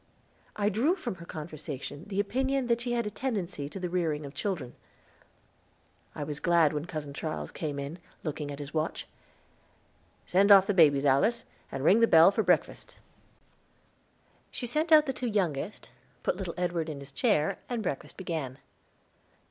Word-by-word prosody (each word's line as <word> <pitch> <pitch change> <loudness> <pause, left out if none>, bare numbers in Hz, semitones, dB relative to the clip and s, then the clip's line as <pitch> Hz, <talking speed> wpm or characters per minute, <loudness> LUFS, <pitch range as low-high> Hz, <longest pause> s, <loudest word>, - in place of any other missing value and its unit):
I 205 0 +1
drew 245 - +2
from 250 - -4
her 170 - -10
conversation 150 -1 -7
the 200 -1 -3
opinion 265 +5 0
that 235 -1 +1
she 240 0 -2
had 235 -2 0
a 210 - -3
tendency 195 - -3
to 195 - -7
the 180 - -2
rearing 165 -4 -1
of 140 - -9
children. 160 -12 -3 1.4
I - - -4
was 145 0 -5
glad 170 -4 +3
when 150 +1 -3
Cousin 155 -5 -6
Charles 155 +2 -4
came 150 -3 -4
in, 140 +5 -5 0.2
looking 150 -2 -4
at 140 - -6
his 145 0 -8
watch. 155 0 -2 1.2
"Send 195 +3 +4
off 195 -1 +9
the 205 - +1
babies, 145 -6 +5
Alice, 175 - +3 0.3
and 135 0 -4
ring 195 +8 +6
the 230 - +5
bell 165 +1 +7
for 220 - +1
breakfast." 180 -3 0 1.5
She 245 - -5
sent 305 +7 0
out 305 -1 +8
the 270 - -2
two 250 - -3
youngest, 195 -4 -2 0.3
put - - +1
little 180 -3 -5
Edward 175 -2 -1
in 145 -2 -5
his 140 0 -10
chair, 155 - +1
and 240 -3 -2
breakfast 145 -7 -4
began. 160 -8 -4
175 Hz, 170 wpm, -29 LUFS, 150-215 Hz, 1.5 s, off